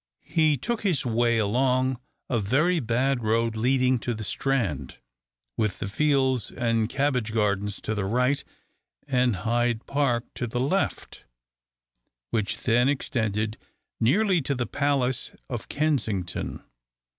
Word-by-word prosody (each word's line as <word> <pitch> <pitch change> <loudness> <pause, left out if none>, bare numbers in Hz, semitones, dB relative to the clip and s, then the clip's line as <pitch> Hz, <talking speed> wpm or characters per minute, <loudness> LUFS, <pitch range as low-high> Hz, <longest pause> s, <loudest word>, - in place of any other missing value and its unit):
He 155 -3 +4
took 235 - -2
his 180 -11 0
way 120 0 +2
along 130 +4 +1 0.3
a 120 - 0
very 150 - +2
bad 125 +1 +1
road 115 +1 +1
leading 125 +2 +2
to 120 0 -2
the 110 - -6
Strand, 100 - -1 0.6
with 105 -4 0
the - - -4
fields 130 +1 +2
and 115 -2 0
cabbage 130 -6 0
gardens 105 -2 0
to 110 - -2
the 105 -2 -2
right, 125 +7 +1 0.6
and 125 -4 +2
Hyde 120 +3 0
Park 135 -4 +1
to 120 - -3
the 120 +2 -3
left, 150 +10 -1 1.1
which 110 -3 0
then 120 +2 +3
extended 110 -5 -1 0.4
nearly 180 - +3
to 140 +1 -1
the 125 -1 -1
Palace 135 -1 0
of 120 -4 -5
Kensington. 125 - -1
120 Hz, 130 wpm, -26 LUFS, 110-135 Hz, 1.1 s, He